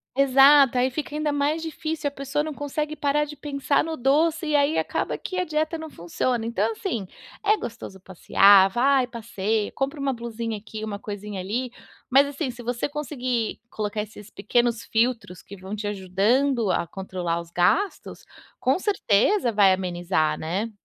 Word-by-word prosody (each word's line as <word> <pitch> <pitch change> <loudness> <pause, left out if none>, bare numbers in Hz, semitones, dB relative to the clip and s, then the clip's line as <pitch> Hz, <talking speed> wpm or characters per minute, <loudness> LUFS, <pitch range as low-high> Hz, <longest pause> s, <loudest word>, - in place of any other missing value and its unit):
Exato! 275 0 +6
Aí 255 +1 +2
fica 295 +2 -5
ainda 300 -1 0
mais 290 +3 0
difícil, 315 -1 -3
a - - -20
pessoa 280 +1 -2
não 310 - -5
consegue 300 +2 -4
parar 290 +1 +1
de 295 -1 -8
pensar 280 -1 0
no 325 0 -3
doce 315 +6 +2
e 300 - +1
aí 285 +2 +2
acaba - - -1
que 370 - -6
a 365 - 0
dieta 310 +1 -1
não 320 0 -8
funciona, 225 - -2
então, 225 -1 0
assim, 220 - -4 0.3
é 425 0 +3
gostoso 225 - -8
passear, 195 +1 +5
vai 255 +3 +2
passeia, 220 -3 -2
compra 275 +3 -3
uma 275 -1 -1
blusinha 230 -2 -5
aqui, 215 +1 -8
uma 205 -2 -4
coisinha 205 -1 -6
ali, 230 +7 -3 0.4
mas, 275 +2 +5
assim, 285 -1 -3
se 240 0 -11
você 240 +3 -2
conseguir 255 -6 -3
colocar 210 0 -3
esses 210 0 -10
pequenos 235 +2 0
filtros 225 -5 -1
que 200 - -11
vão 190 +2 -9
te 205 0 -4
ajudando 210 +5 +1
a 175 - +1
controlar 180 -2 -4
os 170 -1 -9
gastos, 180 - 0 0.3
com 260 +4 +2
certeza 370 - +2
vai 200 -2 +5
amenizar, 175 -3 0
né. 195 +8 -3
245 Hz, 170 wpm, -24 LUFS, 205-290 Hz, 0.4 s, Exato